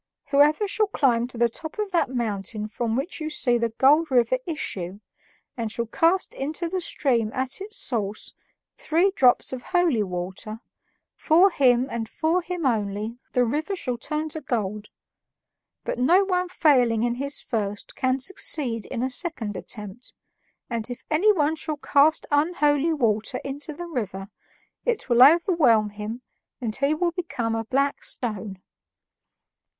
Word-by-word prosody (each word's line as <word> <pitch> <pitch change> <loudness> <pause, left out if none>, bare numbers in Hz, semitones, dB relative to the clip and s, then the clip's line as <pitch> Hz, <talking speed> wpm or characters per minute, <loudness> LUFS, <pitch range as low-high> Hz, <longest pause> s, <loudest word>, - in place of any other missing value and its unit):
Whoever 300 +8 +4
shall 425 +1 +1
climb 245 - +1
to 250 - -11
the 235 0 +4
top 315 - -7
of 420 -2 -2
that 340 -7 +1
mountain 215 -3 -3
from 225 +1 -2
which 295 +6 -3
you 310 - -2
see 245 -5 +2
the 230 0 0
Golden 275 +4 +3
River 375 - +3
issue, 195 - -4 0.6
and 230 -4 -3
shall 235 +1 -2
cast 335 - +1
into 310 +5 -3
the 370 +2 -2
stream 240 -9 0
at 260 +7 -2
its 425 +2 -6
source 215 -4 -2 0.4
three 345 +5 +2
drops 255 -7 +3
of 255 - -5
holy 345 - +1
water, 190 +3 -5 0.6
for 350 +5 +4
him 255 -4 +3
and 230 -4 -4
for 330 +3 0
him 355 -2 -4
only 215 -1 -1
the 250 -1 +3
river 310 - -2
shall 250 -9 -3
turn 305 +5 -2
to 315 +1 -5
gold. 210 -7 -3 0.9
But - - -3
no 345 +10 +5
one 365 -1 0
failing 250 -10 +3
in 240 0 +1
his 280 +3 -3
first 205 -4 -4
can 260 0 +1
succeed 260 - -1
in 245 -1 -3
a 260 - -1
second 250 - -2
attempt, 210 +3 -8 0.5
and 235 -1 -4
if 245 - -7
anyone 320 -3 +3
shall 310 -1 -4
cast 295 +2 +3
unholy 295 0 +2
water 230 -4 0
into 285 +3 -5
the 345 +4 -7
river, 200 - -4 0.5
it 475 -3 -1
will 240 0 +4
overwhelm 285 - +5
him 215 +4 -6 0.4
and 225 -4 -3
he 280 +3 +1
will 345 +2 0
become 280 -10 -3
a 225 0 -2
black 275 +4 0
stone." 205 -5 -4
260 Hz, 155 wpm, -24 LUFS, 225-315 Hz, 0.9 s, no